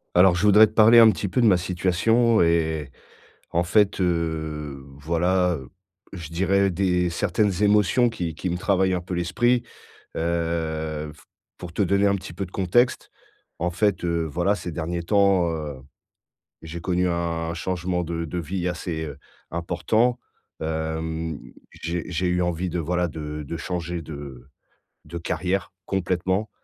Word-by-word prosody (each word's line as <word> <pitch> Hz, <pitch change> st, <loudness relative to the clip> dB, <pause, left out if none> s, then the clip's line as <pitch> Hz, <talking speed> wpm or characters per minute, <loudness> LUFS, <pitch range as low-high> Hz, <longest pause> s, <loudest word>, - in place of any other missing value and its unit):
Alors, 90 Hz, 0 st, +6 dB
je 90 Hz, -, -1 dB
voudrais 105 Hz, +1 st, +8 dB
te 105 Hz, -, -7 dB
parler 110 Hz, +2 st, +7 dB
un 115 Hz, -1 st, +9 dB
petit 105 Hz, -, -3 dB
peu 110 Hz, -, -1 dB
de 120 Hz, -, +4 dB
ma 100 Hz, -4 st, +6 dB
situation 95 Hz, +6 st, +2 dB
et 80 Hz, -3 st, +1 dB, 0.6 s
en 85 Hz, -, +2 dB
fait, 100 Hz, +2 st, +2 dB
heu, 80 Hz, -5 st, -2 dB
voilà, 90 Hz, +4 st, +1 dB
heu, 65 Hz, -5 st, -9 dB, 0.4 s
je 85 Hz, -5 st, -7 dB
dirais 95 Hz, +3 st, +2 dB
des 90 Hz, -1 st, +1 dB
certaines 100 Hz, +2 st, 0 dB
émotions 105 Hz, +4 st, +4 dB
qui 85 Hz, -8 st, -4 dB
qui 90 Hz, -, -3 dB
me 90 Hz, -, -1 dB
travaillent 95 Hz, -1 st, +2 dB
un 90 Hz, -, 0 dB
peu 90 Hz, +1 st, -7 dB
l'esprit. 120 Hz, +8 st, +1 dB, 0.5 s
Heu, 80 Hz, -2 st, -2 dB
f 75 Hz, -, -20 dB, 0.3 s
pour 90 Hz, -2 st, -8 dB
te 100 Hz, -, -1 dB
donner 100 Hz, +1 st, +3 dB
un 100 Hz, -, +2 dB
petit 95 Hz, -3 st, -7 dB
peu 95 Hz, +3 st, -4 dB
de 90 Hz, -, -15 dB
contexte. 120 Hz, +8 st, +1 dB, 0.5 s
En 90 Hz, +1 st, 0 dB
fait, 100 Hz, +2 st, 0 dB
heu, 85 Hz, -1 st, 0 dB
voilà, 85 Hz, +6 st, +1 dB
ces 90 Hz, -, -6 dB
derniers 85 Hz, +2 st, -3 dB
temps, 100 Hz, -2 st, +3 dB
heu, 75 Hz, -4 st, -4 dB, 0.9 s
j'ai 80 Hz, +1 st, -7 dB
connu 90 Hz, +1 st, 0 dB
un 85 Hz, -1 st, -2 dB
changement 90 Hz, 0 st, -2 dB
de 85 Hz, 0 st, -3 dB
de 85 Hz, +2 st, -4 dB
vie 90 Hz, +2 st, -3 dB
assez, 85 Hz, -2 st, -4 dB
heu, 70 Hz, -3 st, -7 dB, 0.3 s
important. 110 Hz, +8 st, +1 dB, 0.4 s
Hem, 80 Hz, 0 st, -3 dB, 0.3 s
j'ai 85 Hz, +1 st, -4 dB
j'ai 90 Hz, +1 st, -1 dB
eu 90 Hz, 0 st, +1 dB
envie 90 Hz, +1 st, -1 dB
de, 85 Hz, -, -2 dB
voilà, 90 Hz, +2 st, 0 dB
de 75 Hz, -1 st, -6 dB
de 80 Hz, +4 st, -5 dB
changer 85 Hz, 0 st, -4 dB
de 70 Hz, -5 st, -9 dB, 0.6 s
de 85 Hz, +3 st, -7 dB
carrière, 90 Hz, +3 st, -2 dB
complètement. 95 Hz, +2 st, -1 dB
85 Hz, 160 wpm, -24 LUFS, 80-95 Hz, 0.9 s, un